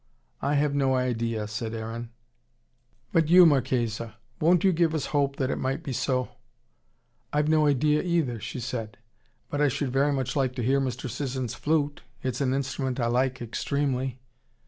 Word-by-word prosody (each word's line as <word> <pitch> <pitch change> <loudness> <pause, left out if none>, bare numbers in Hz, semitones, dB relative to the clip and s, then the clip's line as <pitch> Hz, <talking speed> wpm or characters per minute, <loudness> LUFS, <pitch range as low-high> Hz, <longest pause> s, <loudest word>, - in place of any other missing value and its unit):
"I 145 +1 +1
have 145 0 +2
no 135 -2 +2
idea," 115 -4 -1
said 110 +1 -4
Aaron. 115 +1 -5 1.0
"But 165 -3 +2
you, 180 +1 +9
Marchesa. 120 -6 +1 0.2
Won't 170 +2 +4
you 190 - +5
give 165 -1 +2
us 155 - -1
hope 140 -1 +2
that 130 -1 -1
it - - -2
might 130 +1 -2
be 135 - -4
so?" 130 0 0 1.0
"I've 150 0 +1
no 155 -1 +4
idea, 150 +2 +3
either," 165 -10 0
said 115 -1 -5
she. - - -34 0.5
"But 145 - -1
I 145 - +5
should 135 0 -1
very 140 +3 +2
much 130 -1 -2
like 130 -3 0
to 125 - -2
hear 135 +4 +2
Mr. 130 -1 -3
Sisson's 130 -1 -3
flute. 145 -1 0 0.2
It's 130 0 -2
an 130 -2 +1
instrument 135 -1 -2
I 120 - +1
like 125 +1 0
extremely." 130 +1 -2
130 Hz, 170 wpm, -27 LUFS, 125-145 Hz, 1.0 s, you